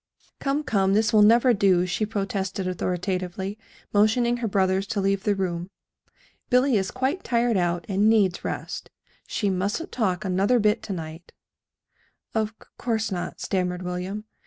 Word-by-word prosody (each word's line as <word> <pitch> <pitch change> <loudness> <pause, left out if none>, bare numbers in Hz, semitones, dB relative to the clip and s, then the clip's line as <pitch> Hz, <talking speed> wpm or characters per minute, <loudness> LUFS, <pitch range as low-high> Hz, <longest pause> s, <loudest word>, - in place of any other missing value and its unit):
"Come, 280 +2 0
come, 195 -7 +2
this 215 0 +2
will 215 - +6
never 235 +4 +6
do," 190 -4 +3
she 195 +4 -1
protested 195 -2 -2
authoritatively, 185 +2 -3 0.3
motioning 235 +4 +3
her 235 -1 -2
brothers 195 -1 +1
to 205 - -2
leave 195 0 0
the 205 -2 +2
room. 180 -2 -3 0.8
"Billy 250 0 +4
is 190 -2 +1
quite 265 +9 -1
tired 235 -1 +1
out, 175 -2 0
and 205 +2 +3
needs 200 -5 +2
rest. - - -5 0.4
She 205 -3 0
mustn't 200 - -2
talk 210 -4 -1
another 195 +6 +2
bit 210 -1 +2
to 200 - -5
night." 165 0 -8 1.0
"Of 220 -1 +1
c - - -19
course 220 -3 -1
not," 180 -2 -4
stammered 180 -1 -1
William. 180 +4 -4
200 Hz, 155 wpm, -25 LUFS, 185-220 Hz, 1.0 s, will